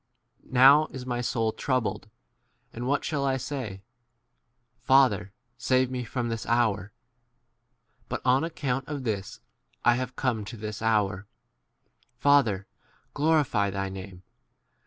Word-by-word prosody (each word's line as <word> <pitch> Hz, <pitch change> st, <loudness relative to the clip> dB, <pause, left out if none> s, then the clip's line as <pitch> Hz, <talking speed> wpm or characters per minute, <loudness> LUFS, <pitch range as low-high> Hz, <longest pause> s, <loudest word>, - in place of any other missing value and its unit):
27 -, -, -23 dB
Now 140 Hz, +5 st, +7 dB
is 130 Hz, -2 st, -8 dB
my 120 Hz, -1 st, -2 dB
soul 115 Hz, -2 st, 0 dB
troubled, 130 Hz, -1 st, -2 dB, 0.6 s
and 120 Hz, +2 st, -5 dB
what 140 Hz, +2 st, 0 dB
shall 145 Hz, -3 st, -1 dB
I 135 Hz, -1 st, +1 dB
say? 120 Hz, -8 st, -5 dB, 1.0 s
Father, 120 Hz, -8 st, +3 dB, 0.3 s
save 130 Hz, 0 st, +2 dB
me 125 Hz, -1 st, -3 dB
from 120 Hz, +1 st, -3 dB
this 115 Hz, -1 st, -3 dB
hour. 110 Hz, -4 st, +1 dB, 1.2 s
But -, -, -4 dB
on 130 Hz, +3 st, +4 dB
ac 165 Hz, 0 st, -4 dB
count 135 Hz, -2 st, -2 dB
of 145 Hz, -3 st, -5 dB
this 105 Hz, -5 st, -4 dB, 0.4 s
I 120 Hz, 0 st, +5 dB
have 130 Hz, 0 st, -4 dB
come 120 Hz, -5 st, -1 dB
to 115 Hz, -, -8 dB
this 105 Hz, 0 st, -6 dB
28 110 Hz, 0 st, +1 dB
hour. 105 Hz, -2 st, 0 dB, 0.9 s
Father, 120 Hz, -8 st, +3 dB, 0.5 s
glorify 145 Hz, -9 st, +2 dB
thy 95 Hz, 0 st, -3 dB
name. 95 Hz, -1 st, -9 dB
120 Hz, 135 wpm, -27 LUFS, 105-135 Hz, 1.2 s, Now